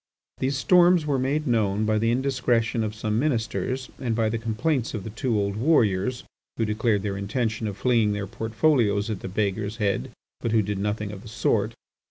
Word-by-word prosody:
These 135 +1 0
storms 175 +2 +5
were 140 -3 +1
made 140 +4 0
known 110 -4 +1
by 110 0 +2
the 115 +1 +1
indiscretion 120 -3 +1
of 105 0 -3
some 110 0 -1
ministers 125 -1 -1
and 120 -4 -1
by 110 -1 +1
the 115 +1 -2
complaints 120 +3 -1
of 105 - -4
the 110 - -6
two 115 0 -1
old 100 0 -1
warriors, 115 - +2 0.3
who 115 - +1
declared 105 -1 0
their 100 -2 -2
intention 110 +2 -2
of 100 -1 -5
flinging 110 -1 +2
their 100 0 -3
portfolios 110 -1 +1
at 105 - -3
the - - -6
beggar's 100 +2 -2
head, 100 -2 0 0.3
but 115 - -2
who 110 -2 +4
did 100 0 -3
nothing 105 0 -2
of 100 -2 -8
the - - -12
sort. 110 - 0
110 Hz, 195 wpm, -25 LUFS, 105-125 Hz, 0.3 s, storms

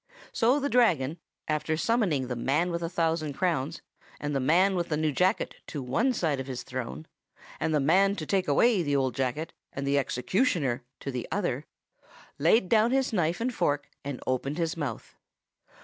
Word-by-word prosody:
"So 250 +5 +3
the 285 - 0
Dragon, 175 - +2 0.3
after 155 +1 0
summoning 185 - +1
the 125 - -3
man 145 +9 +1
with 170 0 -2
the 165 - -2
thousand 165 -3 0
crowns 160 -2 -1 0.4
and 145 -1 -3
the - - +2
man 175 +9 +4
with 175 -1 -1
the 150 - 0
new 155 0 +1
jacket 180 +6 +1
to 145 -4 -5
one 230 - +1
side 160 - 0
of 130 - -5
his 130 -2 -5
throne, 130 +4 -5 0.5
and 160 - 0
the 150 - +3
man 190 +8 +4
to 160 - -5
take 190 +2 0
away 200 +8 +4
the 145 -3 0
old 130 -2 +1
jacket 135 +6 -2 0.2
and 135 - -4
the 140 +1 +3
executioner 135 - 0 0.2
to 135 - -4
the 125 -2 -4
other, - - -1 0.7
laid 180 +7 +4
down 220 +3 +4
his 265 -1 +1
knife 175 -3 +1
and 245 +2 -1
fork 145 -8 -1
and 140 -2 -5
opened 135 +3 -1
his 165 -1 -1
mouth. 145 -9 -5
155 Hz, 185 wpm, -28 LUFS, 135-185 Hz, 0.7 s, man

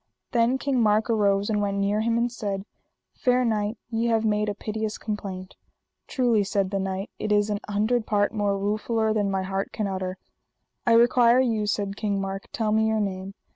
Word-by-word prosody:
Then 240 +2 +3
King 265 -2 0
Mark 215 +1 +3
arose 200 -2 +2
and 210 -2 0
went 200 -1 -1
near 200 +2 +1
him 230 +1 +1
and 235 +1 +1
said: 200 -4 -4 0.5
Fair 250 0 +2
knight, 215 -1 0
ye 230 +1 0
have 225 -1 +2
made 210 0 +1
a 205 - -3
piteous 215 0 -4
complaint. 195 -3 -5 0.5
Truly, 240 -5 +2
said 195 -1 -1
the 195 - 0
knight, 190 +1 -3
it 215 - -2
is 205 0 +3
an 205 - -1
hundred 215 +3 +1
part 205 0 +1
more 205 -2 0
ruefuller 215 +2 0
than 205 -2 +1
my 190 -1 -1
heart 195 +1 -3
can 215 - -2
utter. 185 -1 -3 0.7
I 230 - +5
require 240 +1 +5
you, 225 -5 +1
said 200 -1 -1
King 205 -2 -1
Mark, 195 0 -4
tell 220 -2 -1
me 220 +1 +3
your 220 0 +1
name. 195 -1 -3
210 Hz, 195 wpm, -25 LUFS, 200-225 Hz, 0.7 s, I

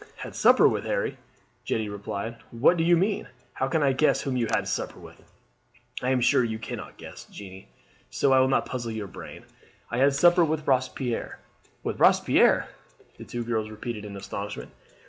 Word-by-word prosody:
"Had - - -8
supper - - +6
with, - - 0
Harry!" - - -1 0.5
Jeanne 110 -1 -1
repeated. 105 +2 -5
"What 120 +9 +3
do 165 - 0
you 170 +1 +5
mean? 195 +3 0 0.3
How 130 - -1
can 155 +2 +1
I 135 -1 +3
guess 150 +4 +2
whom 135 -3 -2
you 120 -2 0
had - - 0
supper - - -3
with?" - - -15 0.7
"I 125 - 0
am 130 -1 +2
sure 125 - +4
you 110 -2 -2
cannot 110 - -7
guess, - - -10
Jeanne, 95 -1 -11 0.4
so 135 - +2
I 130 - +6
will 130 - +4
not 135 - +1
puzzle 120 -3 -4
your 110 -2 -4
brain. 95 - -10 0.5
I 120 - -1
had 135 +1 +4
supper 175 +4 +5
with 155 -1 -1
Robespierre." 130 -2 -1 0.5
"With - - -3
Robespierre!" - - +4 0.5
the - - -8
two 120 0 -4
girls 110 -2 -2
repeated 110 0 -6
in 100 -1 -8
astonishment. 100 +1 -6
125 Hz, 185 wpm, -26 LUFS, 110-140 Hz, 0.7 s, supper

